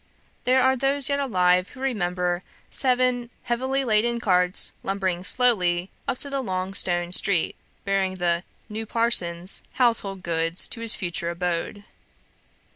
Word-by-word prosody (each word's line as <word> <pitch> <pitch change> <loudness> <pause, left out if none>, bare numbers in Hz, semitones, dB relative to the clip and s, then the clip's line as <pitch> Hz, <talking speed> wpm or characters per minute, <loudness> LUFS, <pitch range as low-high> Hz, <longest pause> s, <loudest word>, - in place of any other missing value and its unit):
There 255 +1 +3
are 260 0 +3
those 275 +1 +2
yet 280 0 0
alive 180 -8 +1
who - - -15
remember 180 -8 -2 0.3
seven 250 -2 0
heavily 260 +3 -2
laden 235 +1 +1
carts 180 -4 +3
lumbering 190 -2 -3
slowly 185 -7 +1 0.2
up - - -2
the 275 0 -2
long 185 -4 -4
stone 175 -2 +1
street, 180 -2 +2 0.3
bearing 195 -1 -1
the 175 -2 -1 0.3
"new 220 0 -6
parson's" 185 -6 +2
household 210 -7 0
goods 165 0 +2
to 230 - -6
his 230 -1 +5
future 175 -2 -4
abode. 175 +3 -4
195 Hz, 130 wpm, -23 LUFS, 180-245 Hz, 0.3 s, his